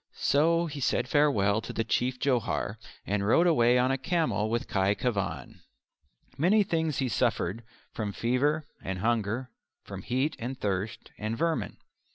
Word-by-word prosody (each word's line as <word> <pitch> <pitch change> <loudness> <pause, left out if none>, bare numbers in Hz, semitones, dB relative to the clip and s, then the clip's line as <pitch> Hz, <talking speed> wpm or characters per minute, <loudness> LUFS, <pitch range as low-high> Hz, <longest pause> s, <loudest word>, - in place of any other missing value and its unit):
So 165 +4 +3
he 150 -3 -6
said 125 -1 0
farewell 110 -8 +3
to 115 - -7
the 115 - -1
Chief 125 +3 0
Johar, 125 -4 0 0.3
and 100 0 -1
rode 120 - +4
away 125 -8 +4
on 125 +1 +3
a 135 - -1
camel 155 -9 0
with 120 +1 -1
Khy 95 +1 +1
Khevan. 100 -9 -3 0.8
Many 200 +7 +4
things 160 -6 -1
he 135 - 0
suffered 100 +1 0 0.3
from 105 -2 -3
fever 140 +8 0 0.2
and 95 0 -3
hunger, 115 +3 -1 0.3
from 100 -1 -8
heat 130 +8 -1
and 130 +3 -5
thirst, 100 +2 -3
and 110 +2 -3
vermin. 165 +3 -1
120 Hz, 155 wpm, -28 LUFS, 105-145 Hz, 0.8 s, rode